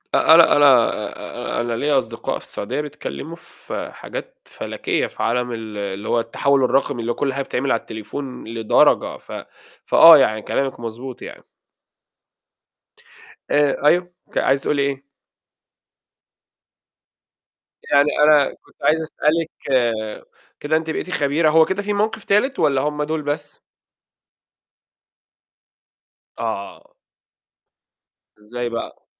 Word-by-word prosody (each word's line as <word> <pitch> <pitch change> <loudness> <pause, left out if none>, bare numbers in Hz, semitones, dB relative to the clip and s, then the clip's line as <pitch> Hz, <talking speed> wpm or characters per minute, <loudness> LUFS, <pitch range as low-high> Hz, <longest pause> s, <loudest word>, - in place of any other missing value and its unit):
أ - - +5
أنا 170 -2 +7
أنا 145 - +5 0.9
آآ - - +1
أنا 120 0 -2
ليَّ 145 +6 -1
أصدقاء 125 -5 -1
في - - -15
السعودية 100 +8 -4
بيتكلّموا 150 +2 -7
في - - -8
حاجات - - -8
فلكيّة - - -3
في - - -6
عالم 125 +1 0
ال 110 -2 -6
اللي 100 +1 -5
هو 120 - +2
التحوّل 135 +4 +1
الرقمي، 135 -1 +1
اللي 115 - -2
هو - - -3
كلّ 135 -2 -1
حاجة 140 - -2
بتتعمل 135 +1 -2
على 115 - +2
التليفون 110 +5 -7
لدرجة، 115 -1 +2
ف - - -16 0.5
فآه 165 -2 +9
يعني 110 -5 +2
كلامِك 135 +4 -2
مضبوط 120 +2 -7
يعني. - - -10 2.1
آآ 145 0 +2
أيوه، 175 +3 +3 0.2
ك - - -4
عايزة 135 0 +2
تقولي 145 -1 0
إيه؟ 140 -1 -2 2.8
يعني 145 +1 +3
أنا 150 -2 +5
كنت - - -26
عايز 160 +1 +3
أسألِك 160 +1 -1 1.1
كده 155 +2 +1
أنتِ 160 0 -4
بقيتِ 160 - -3
خبيرة 155 -1 +1
هو 160 +1 +5
كده 190 +4 -2
في 205 0 -2
موقف 215 +1 -1
تالت 255 +7 +1
والّا 140 -4 +2
هُم 150 +1 -2
دول 155 +1 -2
بس؟ 145 0 -5 2.8
آه. 110 -4 -5 1.5
إزاي 120 +3 -5
بقى؟ 115 0 -7
140 Hz, 125 wpm, -20 LUFS, 120-155 Hz, 2.8 s, فآه